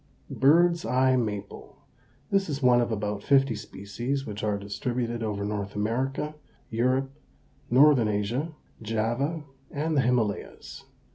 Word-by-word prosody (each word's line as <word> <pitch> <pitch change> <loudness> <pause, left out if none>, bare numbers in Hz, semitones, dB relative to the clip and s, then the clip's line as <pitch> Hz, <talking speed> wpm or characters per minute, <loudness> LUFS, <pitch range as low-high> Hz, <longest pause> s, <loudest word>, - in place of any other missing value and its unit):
BIRD'S 170 +5 +4
EYE 130 0 +3
MAPLE. 105 -5 -4 0.5
This 195 -3 +2
is 140 -1 -3
one 125 -1 +5
of 120 - -1
about 105 -1 -2
fifty 135 0 +3
species, 115 +6 -4
which 105 0 -6
are 105 -1 0
distributed 120 +3 -3
over 105 -2 -2
North 100 -1 -4
America, 130 +8 -1 0.4
Europe, 130 +4 +1 0.6
Northern 130 -2 +5
Asia, 110 +10 -1 0.3
Java, 120 +8 -1 0.3
and 155 +2 -2
the 140 - +4
Himalayas. 120 -5 -2
120 Hz, 125 wpm, -27 LUFS, 105-135 Hz, 0.6 s, one